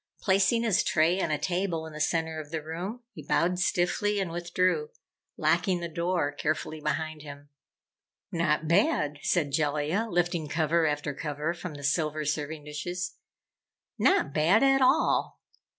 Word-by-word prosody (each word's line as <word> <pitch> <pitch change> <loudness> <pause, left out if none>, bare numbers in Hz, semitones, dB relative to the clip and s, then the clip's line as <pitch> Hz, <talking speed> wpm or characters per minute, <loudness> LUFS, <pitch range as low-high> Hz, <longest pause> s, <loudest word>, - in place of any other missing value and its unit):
Placing 195 +4 +2
his 220 -5 +2
tray 170 +4 +2
on - - 0
a 150 - +1
table 175 0 -1
in 160 - -9
the 155 - -6
center 160 0 0
of 150 -2 -8
the 160 -1 -4
room, 180 +10 -5
he 155 - -9
bowed 175 +5 +1
stiffly 190 +3 +1
and 190 -4 -2
withdrew, 180 - 0 0.5
locking 185 -3 +2
the 170 - -4
door 170 -2 -1
carefully 155 +1 -3
behind 155 0 -2
him. 145 -1 -11 0.8
"Not 160 -2 0
bad," 170 - +2
said 150 -6 +1
Jellia, 150 +8 0
lifting 175 -3 0
cover 160 +1 +1
after 145 -1 -2
cover 150 +3 -3
from 175 -2 -7
the 145 - -9
silver 150 +1 0
serving 150 +1 -3
dishes. 175 +5 -5 0.8
"Not 385 -1 +3
bad 170 - +4
at 270 0 +4
all! 260 +3 +2
165 Hz, 150 wpm, -28 LUFS, 150-180 Hz, 0.8 s, bad